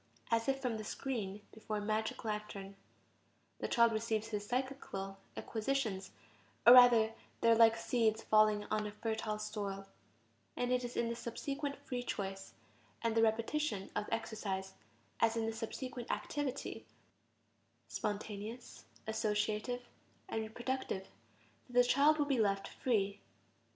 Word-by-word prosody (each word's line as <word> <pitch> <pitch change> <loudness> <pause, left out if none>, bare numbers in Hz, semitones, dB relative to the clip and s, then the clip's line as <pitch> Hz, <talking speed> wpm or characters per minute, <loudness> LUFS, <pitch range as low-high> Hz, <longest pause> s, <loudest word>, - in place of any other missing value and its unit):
As 230 +1 +2
if 270 0 +1
from 245 -4 -1
the 215 - -5
screen 210 -4 -3
before 215 -1 -4
a 205 - -3
magic 220 +1 -1
lantern, 210 -2 -4 0.8
the - - -2
child 235 -1 +5
receives 220 0 -1
his 205 -2 -3
psychical 245 -7 -3 0.2
acquisitions, 220 -4 -1 0.6
or 240 - +11
rather 240 -3 +8 0.3
they 230 - +5
are - - +7
like 225 0 +6
seeds 225 -1 +1
falling 215 -1 +4
on 215 0 +1
a - - -5
fertile 220 0 -2
soil; 205 -2 -4 0.7
and 245 0 0
it 250 0 +2
is 245 0 -5
in 235 - +2
the 235 - -2
subsequent 280 +5 -4
free 250 -2 -2
choice, 195 -4 -4 0.5
and 230 -1 +2
the 225 - +3
repetition 225 0 0
of 210 - -1
the - - -3
exercise, 195 -4 -4 0.5
as 230 0 +3
in 225 - +1
the 225 - -1
subsequent 240 +2 -5
activity, 265 - -3 1.0
spontaneous, 210 - -5 0.2
associative, 215 +2 -1 0.4
and 225 - -2
reproductive, 220 -3 -3 0.6
that - - -13
the 245 - +9
child 280 +5 +5
will 295 - +2
be 275 -4 +1
left 195 -2 +2
"free." 205 -5 0
220 Hz, 140 wpm, -35 LUFS, 210-245 Hz, 1.0 s, or